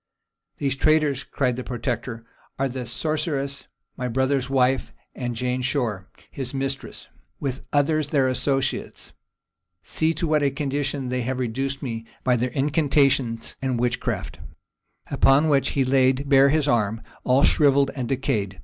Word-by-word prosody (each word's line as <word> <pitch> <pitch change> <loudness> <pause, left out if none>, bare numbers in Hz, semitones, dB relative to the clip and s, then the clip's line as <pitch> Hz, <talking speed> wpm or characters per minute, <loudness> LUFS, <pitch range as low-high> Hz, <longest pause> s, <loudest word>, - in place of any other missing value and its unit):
"These 135 -1 -1
traitors," 155 -3 +2
cried 125 -3 -1
the 130 - -4
protector, 120 -1 -4 0.3
"are 135 - +1
the 125 -2 -5
sorceress, 140 +1 -2 0.3
my 125 - -2
brother's 130 +2 0
wife, 130 -1 +2 0.2
and 120 -2 -4
Jane 125 +2 -1
Shore, 120 -8 -1 0.2
his 135 -1 -5
mistress, 135 0 -4 0.3
with 135 -2 -4
others 150 +1 +2
their 140 -3 +2
associates: 135 +1 -1 0.7
see 160 +1 0
to 165 - -1
what 155 -1 +2
a 140 - +3
condition 140 -1 -2
they 125 0 -1
have 125 +2 -2
reduced 135 +3 -2
me 115 -3 -5 0.2
by 125 -1 +3
their 125 +2 0
incantations 140 -4 +1
and 130 -3 -1
witchcraft:" 120 0 -2 0.7
upon 145 +4 +4
which 135 -2 +3
he 135 -2 +2
laid 130 +1 +2
bare 140 0 +6
his 150 0 +2
arm, 115 -3 +1 0.2
all 130 +2 +3
shrivelled 140 -3 +4
and 125 -4 -4
decayed. 105 -8 -1
135 Hz, 145 wpm, -24 LUFS, 125-140 Hz, 0.7 s, bare